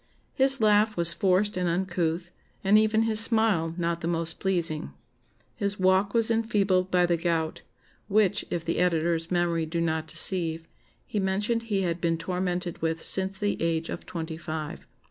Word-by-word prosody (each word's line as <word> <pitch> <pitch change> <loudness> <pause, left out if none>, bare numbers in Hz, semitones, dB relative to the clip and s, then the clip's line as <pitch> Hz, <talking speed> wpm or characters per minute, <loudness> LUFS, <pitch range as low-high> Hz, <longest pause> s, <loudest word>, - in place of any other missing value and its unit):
His 270 0 +3
laugh 215 -1 +3
was 170 0 +5
forced 190 +4 +1
and 180 -1 -1
uncouth, 175 -1 -2 0.3
and 200 +2 +3
even 220 +1 +3
his 220 -1 +3
smile 220 -8 +3
not 170 -1 -2
the 165 - -3
most 165 -1 -2
pleasing. 170 -5 -2 0.6
His 200 -1 -3
walk 190 +3 +2
was 230 0 +2
enfeebled 200 -5 +1
by 180 -1 +3
the 175 -1 +1
gout; 165 -1 -2 0.5
which, 210 0 +2
if 165 -1 -4
the 170 - -1
editor's 165 -1 0
memory 170 -2 0
do 170 +2 -3
not 160 -1 -1
deceive, 165 -2 +3 0.4
he 210 - -3
mentioned 205 +4 -1
he 195 -2 0
had 170 -1 -2
been 165 -1 0
tormented 180 0 -3
with 165 0 -2
since 190 0 -1
the 205 0 -2
age 165 0 -1
of - - -7
twenty 160 -2 -6
five.... 155 -2 -6
180 Hz, 165 wpm, -26 LUFS, 165-200 Hz, 0.6 s, was